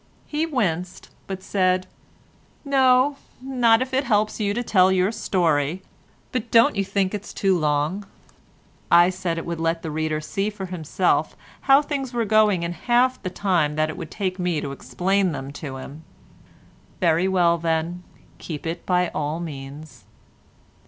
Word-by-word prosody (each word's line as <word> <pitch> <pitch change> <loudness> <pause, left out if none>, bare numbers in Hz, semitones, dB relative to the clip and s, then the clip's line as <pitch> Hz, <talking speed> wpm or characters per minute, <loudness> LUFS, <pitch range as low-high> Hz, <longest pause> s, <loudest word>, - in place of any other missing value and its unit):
He 310 +2 -2
winced, 185 - -2 0.2
but 190 -1 -6
said 185 -1 +1 0.8
"No, 265 0 +3 0.2
not 250 -2 +3
if 260 +1 -10
it 265 +2 +2
helps 215 -4 +1
you 205 -2 0
to 240 +4 -2
tell 190 -4 +4
your 190 +2 +2
story: 170 -5 0 0.5
but 240 -2 -3
don't 230 -2 +5
you 200 - +1
think 195 0 -1
it 205 -1 -4
is - - -10
too 195 -2 +2
long?" 155 +5 0 0.8
I 175 +1 +6
said 180 -2 -3
it 165 - -4
would 170 -1 -4
let 165 0 -1
the 160 - -4
reader 155 0 -1
see 195 +6 -2
for 205 -2 -7
himself 180 0 0 0.3
how 275 +2 +7
things 275 -4 -4
were 235 -1 0
going 210 -4 +3
in 170 - -2
half 245 +8 +1
the 185 - -3
time 175 -6 0
that 155 0 0
it - - -9
would - - -7
take 185 -2 -3
me 180 -3 0
to 140 - -5
explain 185 +5 0
them 135 -1 -6
to 135 -3 -6
him. 140 +4 -10 1.0
"Very 170 +1 +2
well 175 -3 +3
then, 165 +1 -1 0.4
keep 155 -2 -7
it 165 +1 -5
by 180 -1 +2
all 150 +2 -3
means." 140 - -9
185 Hz, 165 wpm, -23 LUFS, 160-215 Hz, 1.0 s, how